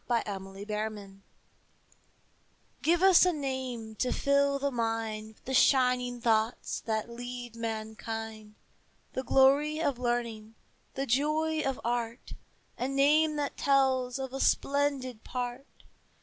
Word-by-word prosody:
THE 235 -2 +1
NAME 195 -2 -5
OF 200 +1 -8
FRANCE 210 -2 -5 1.6
Give 335 +4 +2
us 380 -2 +7
a 365 - +4
name 260 -7 -4
to 250 - 0
fill 280 0 +2
the 280 0 -1
mind 225 -2 -3
With - - -30
the 265 - -3
shining 250 -2 +3
thoughts 225 0 0
that 220 0 -1
lead 245 0 -7
mankind, 220 -1 -5 0.6
The 260 - -2
glory 280 +4 +4
of 280 -6 0
learning, 235 -3 -2 0.4
the 270 - -1
joy 305 +5 +1
of 270 -2 -2
art, 235 0 -3 0.5
A 250 - 0
name 300 +3 +3
that 290 -1 -3
tells 265 -2 +2
of 265 -1 -5
a 270 - -4
splendid 275 -5 0
part. 250 +2 -4
250 Hz, 130 wpm, -30 LUFS, 225-275 Hz, 1.6 s, us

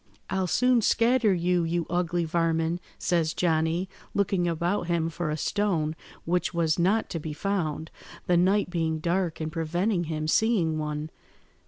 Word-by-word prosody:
"'I'll 190 -1 0
soon 250 +6 +3
scatter 230 0 +3
you, 175 -1 +1
you 170 0 -1
ugly 175 0 0
varmin,' 165 +1 0 0.2
says 165 -3 0
Johnny, 165 +1 +1 0.3
looking 195 -3 +1
about 170 +2 -1
him 170 -2 0
for 170 -1 -3
a 155 - -2
stone, 165 -3 0 0.3
which 180 +1 0
was 165 -1 +1
not 200 +6 +2
to 165 - -2
be 155 0 -5
found, 165 -3 -2 0.3
the 180 - +2
night 185 +2 +2
being 160 -2 0
dark 170 +1 -1
and 155 0 -3
preventing 175 +4 0
him 155 -1 -3
seeing 170 -5 +2
one. 150 0 -4
170 Hz, 155 wpm, -27 LUFS, 160-185 Hz, 0.3 s, soon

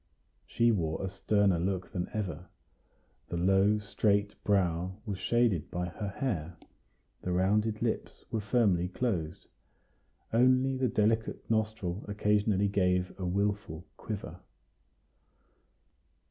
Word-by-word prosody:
She 115 0 +3
wore 85 -3 -1
a 95 - -4
sterner 100 -2 +2
look 90 +1 -2
than 90 -1 -3
ever; 100 -9 -4 0.8
the 85 - -2
low, 95 +4 +4
straight 100 0 +1
brow 90 -2 +1
was 100 -4 -4
shaded 115 -5 +1
by 90 0 -3
her 105 +4 -5
hair; 95 - -3 0.6
the 90 - -3
rounded 105 +4 +1
lips - - -3
were 110 - -1
firmly 100 -5 +2
closed; 90 -6 -2 0.9
only 130 +3 +4
the 130 0 +1
delicate 110 0 0
nostril 105 -4 -1
occasionally 105 -1 +2
gave 90 -2 +1
a 90 - -2
wilful 100 -3 -1
quiver. 105 -2 -6
100 Hz, 115 wpm, -30 LUFS, 90-110 Hz, 0.9 s, low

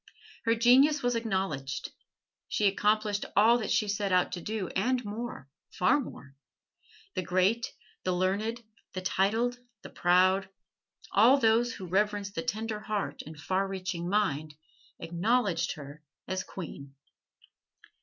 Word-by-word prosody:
Her 230 0 +3
genius 265 +5 +5
was 245 0 +2
acknowledged. 190 - -2 0.6
She 210 - 0
accomplished 210 +1 +2
all 225 +4 +6
that 220 - -3
she 230 -3 +2
set 200 -1 -1
out 180 0 +3
to 175 - -4
do 210 0 -3
and 250 +5 0
more 215 - -6 0.3
far 185 +10 +3
more. 140 - -9 0.8
The - - -1
great, 185 +7 +1 0.3
the 185 - 0
learned, 200 +6 -1 0.3
the 185 - -4
titled, 225 +7 +1 0.2
the - - -10
proud 185 +2 +3 0.6
all 235 +7 +6
those 235 0 +3
who 190 - -7
reverence 205 +2 0
the 165 - -3
tender 220 +3 -3
heart 210 -1 -3
and 155 -1 -10
far 185 +6 0
reaching 185 -2 -4
mind 155 -7 0 0.4
acknowledged 185 +1 0
her 145 +1 -10 0.3
as 185 0 -2
queen. 140 -6 -9
200 Hz, 135 wpm, -29 LUFS, 180-225 Hz, 0.8 s, all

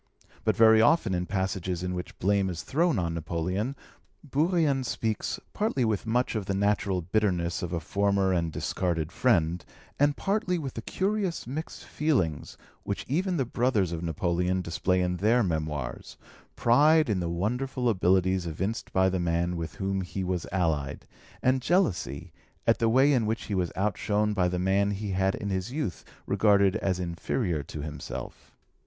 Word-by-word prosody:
But - - +2
very 110 -1 +7
often 120 - +3
in 90 0 -1
passages 95 -2 -2
in 90 0 -2
which 90 0 -6
blame 100 0 +1
is 85 -2 -5
thrown 165 +2 +1
on 85 -3 -1
Napoleon, 90 - -2 0.5
Bourrienne 150 -1 +1
speaks, 110 -3 -2
partly 205 - 0
with 110 0 -1
much 120 +3 +1
of 105 -4 -3
the 100 - 0
natural 100 -2 +1
bitterness 90 -3 0
of 90 - -4
a 85 - -1
former 100 +2 +1
and 85 -2 0
discarded 85 -2 -2
friend, 90 -7 +2 0.4
and 145 0 +3
partly 195 -3 0
with 140 -6 -5
the 115 - -5
curious 195 - -1
mixed 145 +7 -6
feeling 130 - 0 0.4
which 100 - -4
even 180 +6 0
the 135 - +1
brothers 115 -7 +1
of 85 -1 -3
Napoleon 90 +2 0
display 90 +2 0
in 90 0 0
their 115 +6 +3
Memoirs, 75 -8 -3 0.4
pride 150 +6 +5
in 105 -5 0
the 85 -1 -2
wonderful 125 +8 -1
abilities 95 -3 +2
evinced 95 +8 -3
by 95 0 +3
the 95 -1 0
man 85 0 0
with 80 -2 -5
whom 95 0 -1
he 95 +1 -4
was 90 -2 -2
allied, 80 -7 -1 0.4
and 130 0 +3
jealousy 125 - 0 0.3
at - - +3
the 115 - +3
way 135 +5 +5
in 120 -5 +2
which 110 +1 -1
he 105 - -5
was 90 -3 0
outshone 105 +1 0
by 90 -3 +2
the 90 0 -1
man 95 +2 +2
he 100 0 -3
had 95 +1 +1
in 100 - -4
youth 105 - -3 0.2
regarded 100 -1 +3
as 95 -4 -1
inferior 85 - -2
to 75 +2 -7
himself. 75 -1 -7
95 Hz, 165 wpm, -28 LUFS, 90-120 Hz, 0.5 s, very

